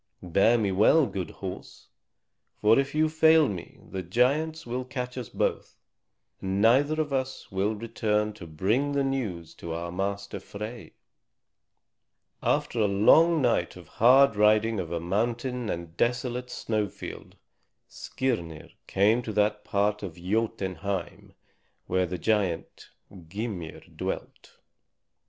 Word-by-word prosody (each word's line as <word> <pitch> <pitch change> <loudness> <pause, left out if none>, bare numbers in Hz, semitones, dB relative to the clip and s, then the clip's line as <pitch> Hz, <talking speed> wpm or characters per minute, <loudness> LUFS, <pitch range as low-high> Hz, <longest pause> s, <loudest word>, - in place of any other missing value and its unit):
Bear 100 +7 +3
me 105 -4 0
well, 110 +11 +5
good 95 -7 -4
horse; 95 -2 -9 0.7
for 110 +4 +5
if 140 +1 -2
you 155 +1 +3
fail 160 -1 +5
me 95 -6 -7
the 95 - -4
giants 140 - +1
will 125 +2 -3
catch 125 -1 -5
us 125 -5 -6
both, - - -2 0.6
and 95 +1 -1
neither 135 +8 +4
of 150 -3 -1
us 130 0 -3
will 100 +3 0
return 105 -1 -1
to 95 -5 -10
bring 110 - 0
the 140 -1 +1
news 110 -12 -3
to 85 -1 -7
our 85 +1 -4
master 100 +2 -3
Frey." 110 +3 -8 1.5
After - - 0
a 105 - +4
long 155 +11 +5
night 115 -8 +1
of 90 -3 -12
hard 130 +1 +7
riding 105 +1 +3
over 85 -2 -3
mountain 120 +6 -2
and 85 -2 -5
desolate 125 +1 -1
snowfield, 105 -3 -4 0.5
Skirnir 85 -12 -4 0.2
came 105 +5 +3
to 115 - -5
that 105 0 +1
part 105 +1 0
of 90 -5 -6
Jotunheim 95 -1 -3 0.5
where 95 -1 +1
the 90 +1 -4
giant 100 -4 -1 0.4
Gymir 100 -3 -5
dwelt. - - -6
105 Hz, 130 wpm, -27 LUFS, 95-125 Hz, 1.5 s, hard